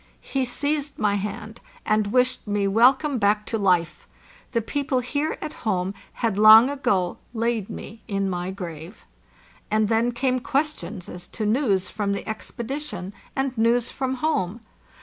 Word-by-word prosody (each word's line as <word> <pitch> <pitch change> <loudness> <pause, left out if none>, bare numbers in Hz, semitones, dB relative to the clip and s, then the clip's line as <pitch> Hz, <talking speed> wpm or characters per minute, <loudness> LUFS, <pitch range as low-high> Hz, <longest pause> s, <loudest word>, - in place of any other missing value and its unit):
He 265 -1 -1
seized 290 +3 -1
my 210 -1 +2
hand, 210 +2 -4 0.2
and 215 -1 +2
wished 250 +2 +1
me 205 -1 +1
welcome 255 +6 +4
back 210 0 +2
to 225 - -2
life; 180 -4 +1 0.4
the 235 - +1
people 265 +3 -1
here 285 +5 -2
at 305 - -5
home 190 -3 0 0.3
had 210 -3 0
long 220 +5 +9
ago 195 -11 0 0.2
laid 230 -3 -1
me 225 +2 -8
in 195 -2 -1
my 180 -1 -2
grave. 175 -1 -8 0.6
And 215 0 +2
then 230 +2 +2
came 255 +1 0
questions 250 - -2
as 180 0 -9
to 220 - -4
news 210 -4 +1
from 205 -2 -1
the 200 - -5
expedition, 220 -3 -5 0.2
and 270 -1 -1
news 235 +1 +2
from 265 -1 -2
home. 250 - -1
220 Hz, 150 wpm, -24 LUFS, 200-255 Hz, 0.6 s, long